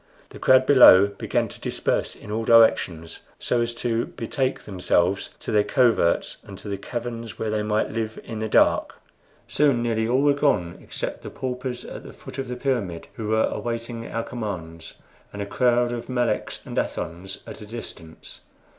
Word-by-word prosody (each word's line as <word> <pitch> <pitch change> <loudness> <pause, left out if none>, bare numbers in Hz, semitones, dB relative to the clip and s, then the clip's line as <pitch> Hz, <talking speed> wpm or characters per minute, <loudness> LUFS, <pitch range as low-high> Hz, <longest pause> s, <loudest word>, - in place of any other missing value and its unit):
The - - -12
crowd 130 0 +5
below 125 -9 +8
began 100 - -1
to - - -12
disperse - - -1
in 105 - -10
all 110 +1 -1
directions, 100 -8 +3 0.2
so 120 - 0
as 120 0 -1
to 115 -1 -1
betake 130 +3 -2
themselves 90 -1 0
to - - -4
their 105 -1 +4
coverts 115 -10 +2
and 100 -2 -10
to - - -8
the 100 -1 -3
caverns, 115 +1 -5
where 110 - -2
they 110 0 0
might 105 0 0
live 110 0 -3
in 110 -2 -6
the 110 0 -2
dark. - - +3 0.5
Soon 140 -5 +2
nearly 110 -1 0
all 130 +4 +2
were 145 -1 +5
gone 140 - 0
except - - -5
the - - -7
paupers 125 -1 -5
at - - -8
the - - -11
foot 135 - -10
of 135 - -3
the 125 - -4
pyramid, 115 -11 -2
who 110 - -5
were 110 +1 +2
awaiting 115 0 -4
our 115 - -3
commands, 90 -10 -6 0.4
and 100 - -8
a 100 - -2
crowd 120 +2 +2
of 120 0 -5
Meleks 120 -4 -1
and - - -7
Athons 90 +3 -4
at - - -9
a 105 - -9
distance. 90 -8 -10
115 Hz, 180 wpm, -24 LUFS, 100-120 Hz, 0.5 s, below